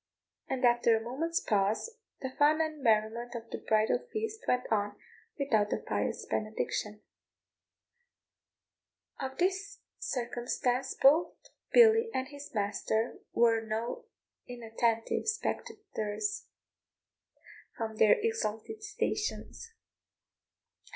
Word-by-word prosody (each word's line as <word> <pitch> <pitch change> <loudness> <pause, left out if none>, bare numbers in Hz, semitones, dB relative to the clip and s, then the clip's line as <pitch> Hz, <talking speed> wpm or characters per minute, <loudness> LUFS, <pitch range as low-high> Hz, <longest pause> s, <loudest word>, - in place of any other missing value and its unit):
And 260 -1 +1
after 240 -1 +5
a 220 - -5
moment's 320 +8 -1
pause 215 - 0 0.2
the 265 - -3
fun 295 +3 +4
and 310 -2 -1
merriment 230 +1 +1
of 230 -1 -7
the - - -4
bridal 215 0 +2
feast 440 0 -3
went 250 0 +2
on 205 -1 0 0.4
without 225 -8 +2
the - - 0
pious - - -2
benediction. 215 0 -2 2.2
Of 265 0 -4
this 390 +3 0 0.2
circumstance 250 - -1
both 300 +6 +5 0.4
Billy 455 -1 +7
and 260 +1 -1
his 285 0 -10
master 215 +2 -1
were 230 -1 +4
no 225 +2 -3 0.4
inattentive 230 - -1
spectators 415 - -3 1.3
from 220 -1 -4
their 215 -1 +6
exalted 435 - -2
stations. 430 +2 -3
245 Hz, 100 wpm, -31 LUFS, -, 2.2 s, Billy